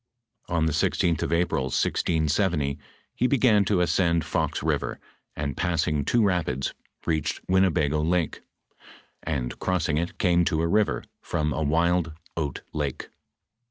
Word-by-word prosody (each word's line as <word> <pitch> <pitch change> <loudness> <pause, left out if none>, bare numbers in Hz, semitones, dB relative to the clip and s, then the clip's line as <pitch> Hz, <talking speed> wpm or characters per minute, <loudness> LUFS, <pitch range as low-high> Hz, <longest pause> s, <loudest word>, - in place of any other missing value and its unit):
On 85 -2 +1
the 80 - +1
16th 80 +2 +1
of - - -2
April, 85 -5 +1
1670, 75 +1 0 0.3
he 125 - +1
began 120 -6 +4
to 95 -2 +2
ascend 85 -1 +2
Fox - - -1
river, - - -1 0.4
and 70 -3 -3
passing 80 -4 0
two 120 +6 +3
rapids, 90 -9 0 0.3
reached 80 -3 -1
Winnebago 80 -5 +2
lake, 85 0 0 0.8
and 70 -6 -3
crossing 85 -5 0
it, 85 +1 -4
came 90 -3 +3
to 80 0 +1
a - - +2
river 105 +4 +1
" - - -53
from 75 -3 0
a 80 - -2
wild 85 +2 +1 0.2
oat 75 -4 -3
lake." 75 -3 -3
85 Hz, 140 wpm, -26 LUFS, 75-90 Hz, 0.8 s, began